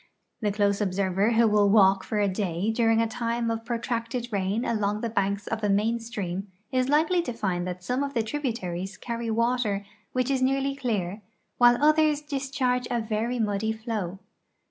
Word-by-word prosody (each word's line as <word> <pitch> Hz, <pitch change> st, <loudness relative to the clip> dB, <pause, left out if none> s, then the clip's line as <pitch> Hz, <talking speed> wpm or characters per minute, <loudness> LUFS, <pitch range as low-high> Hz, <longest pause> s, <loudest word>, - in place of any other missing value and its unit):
The 210 Hz, -2 st, +1 dB
close 200 Hz, 0 st, +1 dB
observer 195 Hz, +2 st, +1 dB
who 230 Hz, 0 st, +5 dB
will 210 Hz, -1 st, +4 dB
walk 195 Hz, -2 st, +5 dB
for 215 Hz, -, -3 dB
a 205 Hz, -, +3 dB
day 190 Hz, 0 st, -1 dB
during 225 Hz, 0 st, +3 dB
a -, -, 0 dB
time 230 Hz, 0 st, -1 dB
of 225 Hz, 0 st, -3 dB
pro 235 Hz, 0 st, -2 dB
tracted 235 Hz, 0 st, -3 dB
rain 200 Hz, +4 st, 0 dB
along 210 Hz, -1 st, 0 dB
the 230 Hz, -, -2 dB
banks 200 Hz, -1 st, 0 dB
of 220 Hz, -1 st, -4 dB
a 205 Hz, -, +2 dB
main 215 Hz, +4 st, +2 dB
stream 200 Hz, -4 st, -4 dB, 0.2 s
is 255 Hz, 0 st, +1 dB
likely 320 Hz, +5 st, +3 dB
to 335 Hz, -, -4 dB
fiiul 185 Hz, -6 st, -1 dB
that 180 Hz, 0 st, -5 dB
some 250 Hz, +6 st, -1 dB
of 280 Hz, -1 st, -3 dB
the 230 Hz, -, +2 dB
tributaries 205 Hz, -, -3 dB
carry 235 Hz, -1 st, -4 dB
water 225 Hz, -3 st, 0 dB, 0.3 s
which 255 Hz, +1 st, 0 dB
is 265 Hz, -1 st, +1 dB
nearly 270 Hz, +1 st, +1 dB
clear 215 Hz, -7 st, -2 dB, 0.4 s
while 240 Hz, 0 st, +7 dB
others 305 Hz, 0 st, +4 dB
discharge 265 Hz, -3 st, -1 dB
a 240 Hz, -1 st, 0 dB
verN' 225 Hz, +2 st, -1 dB
muddy 210 Hz, +2 st, -1 dB
flow. 220 Hz, -5 st, -4 dB
225 Hz, 185 wpm, -26 LUFS, 200-245 Hz, 0.4 s, while